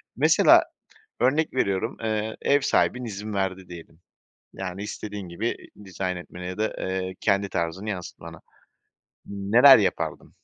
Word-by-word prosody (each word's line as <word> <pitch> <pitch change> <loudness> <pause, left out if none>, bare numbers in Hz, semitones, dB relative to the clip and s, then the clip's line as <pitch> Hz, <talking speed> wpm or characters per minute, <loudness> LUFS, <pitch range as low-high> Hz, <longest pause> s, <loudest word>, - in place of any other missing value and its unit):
Mesela - - +5 0.6
örnek 135 +4 +1
veriyorum, 100 -2 -1
eee, 110 0 -2
ev 145 0 +3
sahibin 125 -2 +1
izin 105 -1 -6
verdi 95 -1 -3
diyelim. 85 -1 -12 0.5
Yani 95 +1 -6
istediğin 105 -2 -6
gibi 105 +7 -3 0.3
i 105 - -15
dizayn 95 -1 -4
etmeni 90 +1 -9
ya 90 - -6
da, 110 0 -1
eee, 95 0 -3
kendi 100 -1 +1
tarzını 85 +5 -3
yansıtmana. 90 -4 -7 0.9
N 100 +3 0
neler 135 -2 +10
yapardın? 100 - -2
100 Hz, 140 wpm, -25 LUFS, 95-110 Hz, 0.9 s, neler